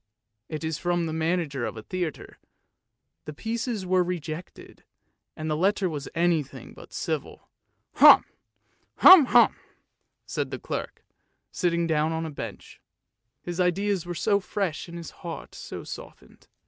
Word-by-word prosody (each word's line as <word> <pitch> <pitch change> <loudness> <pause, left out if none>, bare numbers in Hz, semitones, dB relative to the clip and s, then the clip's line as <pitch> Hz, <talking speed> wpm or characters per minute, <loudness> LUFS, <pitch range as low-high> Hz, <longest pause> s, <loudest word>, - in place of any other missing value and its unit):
" 110 +1 -55
It 155 0 -4
was 160 -1 -3
from 175 -1 0
the 160 - -3
manager 160 -5 -1
of 115 - -4
a 110 - -8
theatre, 175 +2 -5 0.9
the 150 - -7
pieces 225 - -3
were 185 0 +3
rejected, 170 -1 -7 0.5
and 155 - -4
the 155 - 0
letter 190 +4 +1
was 150 -4 -5
anything 165 -4 -1
but - - -14
civil. - - -5 0.2
" - - -49
Hum! - - +9 0.7
hum! 355 -8 +8 0.4
" - - -52
said - - -3
the - - -5
clerk, - - -6 0.5
sitting 170 -2 0
down 160 0 +1
on 160 0 -2
a 160 - -5
bench; 115 -8 -9 0.6
his 175 0 -5
ideas 185 0 0
were 175 - -4
so 200 +3 +2
fresh 195 -5 -3
and 170 0 -8
his 170 - -8
heart 165 -4 -7
so - - -8
softened. - - -11
170 Hz, 150 wpm, -26 LUFS, 155-185 Hz, 0.9 s, Hum